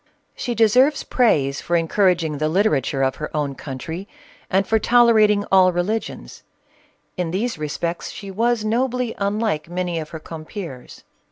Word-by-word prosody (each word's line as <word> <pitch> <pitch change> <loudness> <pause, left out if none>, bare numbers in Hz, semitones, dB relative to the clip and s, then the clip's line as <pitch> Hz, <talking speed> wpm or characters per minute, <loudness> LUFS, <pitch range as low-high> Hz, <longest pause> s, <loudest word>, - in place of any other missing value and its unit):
She 240 - -3
deserves 250 +6 +4
praise 140 - +1
for 175 - -1
encouraging 170 -3 +1
the 155 0 +1
literature 155 -7 +1
of 130 0 0
her 150 - -5
own 145 -2 -1
country, 160 +8 -7 0.4
and 195 +1 +2
for 220 0 +2
tolerating 215 -3 +4
all 185 -1 +6
religions; 185 +6 -3 0.8
in 180 -2 -1
these 200 +2 -2
respects 165 +3 -3
she 200 -2 -8
was 230 +2 0
nobly 250 +1 0
unlike 200 -5 -1
many 175 -1 -2
of 155 -1 -6
her 160 - -7
compeers. 155 - -9
185 Hz, 145 wpm, -21 LUFS, 160-220 Hz, 0.8 s, all